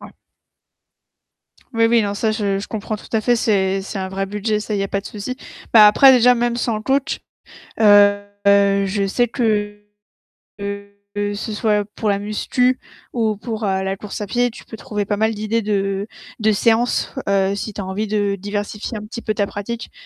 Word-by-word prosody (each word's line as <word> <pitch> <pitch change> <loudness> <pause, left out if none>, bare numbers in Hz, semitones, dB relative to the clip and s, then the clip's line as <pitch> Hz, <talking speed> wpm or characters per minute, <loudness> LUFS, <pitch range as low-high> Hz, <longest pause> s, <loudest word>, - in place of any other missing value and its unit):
Ouais. - - -11 1.6
Oui, 230 -1 +2
oui, 230 0 +4
non, 200 -1 -2
ça 215 +2 0
je 200 -3 -1
je 200 - -5
comprends 215 0 -4
tout - - -14
à 225 - +2
fait. 240 +2 +2
C'est 195 -4 +1
c'est 195 +1 -6
un 190 - -3
vrai 195 +1 -3
budget, 210 +2 -1
ça, 210 0 -4
il 200 - -1
y - - +1
a 195 - -2
pas 200 - -1
de 200 - -12
souci. 215 +5 -6 0.4
Bah, 215 -2 +9
après 265 +6 +7
déjà 250 0 +6
même 240 0 0
sans 235 -1 -1
le 215 - -4
coach, 270 +3 0 0.6
heu, 205 -1 +6 0.2
je 200 0 +3
sais 240 +5 +1
que 210 -4 -1 0.7
que 200 0 -6 0.2
que 205 0 -1
ce 210 +2 -5
soit 210 -1 +1
pour 220 - -3
la 200 -1 +1
musculation 250 +5 0 0.3
ou 220 -3 0
pour, 220 0 -5
heu, 190 -1 0
la 190 0 -2
course 210 +1 -7
à 205 - -3
pied, 245 +4 +1
tu - - -12
peux 225 - -10
trouver 210 0 -3
pas 205 +1 -1
mal 220 +1 +1
d'idées 215 +2 -1
de 195 -1 -1 0.3
de 220 0 +3
séances, 230 +3 +1
heu, 195 0 +2
si 210 +1 -5
tu 200 - -5
as - - -5
envie 195 +3 -3
de 205 -1 0
diversifier 205 +3 -4
un 210 - -7
petit 235 +2 -7
peu 215 - -1
ta 205 -1 0
pratique, 230 +4 -6
210 Hz, 205 wpm, -20 LUFS, 200-225 Hz, 1.6 s, Bah